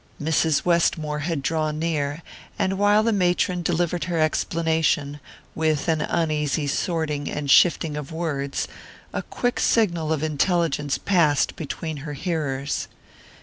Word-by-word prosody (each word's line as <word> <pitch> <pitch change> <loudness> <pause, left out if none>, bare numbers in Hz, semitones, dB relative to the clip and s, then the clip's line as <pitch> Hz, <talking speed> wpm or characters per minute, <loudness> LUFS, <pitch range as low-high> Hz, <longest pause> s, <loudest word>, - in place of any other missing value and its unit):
Mrs. 160 0 +1
Westmore 160 -3 +1
had 150 -2 -2
drawn 155 0 -1
near, 155 -1 -2 0.3
and 190 +1 0
while 205 +1 +4
the 230 0 +2
matron 180 -1 +1
delivered 175 0 0
her 175 -1 -2
explanation, 155 -2 +1 0.3
with 155 -1 0
an 160 -2 +1
uneasy 155 -2 0
sorting 150 -1 -1
and 145 -2 -2
shifting 165 -2 +4
of 150 -1 -6
words, 145 -4 -2 0.5
a - - -1
quick 245 0 -2
signal 170 -8 +2
of 155 -1 0
intelligence 155 -2 +1
passed 165 -7 +2
between 160 0 -5
her 145 +1 -6
hearers. 145 -3 -2
160 Hz, 130 wpm, -24 LUFS, 150-170 Hz, 0.5 s, while